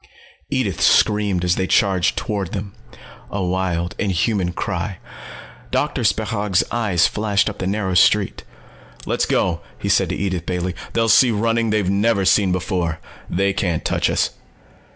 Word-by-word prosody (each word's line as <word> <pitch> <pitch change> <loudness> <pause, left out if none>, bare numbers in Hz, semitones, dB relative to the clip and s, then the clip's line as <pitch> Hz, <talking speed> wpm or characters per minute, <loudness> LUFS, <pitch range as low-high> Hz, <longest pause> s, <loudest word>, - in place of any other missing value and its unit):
Edith - - -1
screamed 105 -4 +3
as 90 0 +1
they 95 - 0
charged 95 -2 +2
toward 100 -6 -3
them. 100 0 -5 0.6
A 100 -1 -3
wild, 90 -1 -1
inhuman 95 -1 0
cry. 95 +1 -3 0.7
Doctor - - -1
Spechaug's 105 -4 +1
eyes 100 -8 +2
flashed 105 -1 +1
up 105 - -4
the 95 - -2
narrow 100 -1 -1
street. 90 - +3 0.6
"Let's - - 0
go!" 85 -2 0 0.2
he 100 - -4
said 95 -2 +3
to 90 - -2
Edith 95 -4 -3
Bailey. 90 0 -2 0.2
"They'll 115 0 +1
see 125 +3 +6
running 115 +1 +1
they've 105 -3 +1
never 100 +1 +1
seen 95 -1 +3
before. 90 -2 -1 0.3
They 100 +2 +1
can't 85 -5 -2
touch - - +1
us." - - +1
95 Hz, 150 wpm, -20 LUFS, 90-105 Hz, 0.7 s, see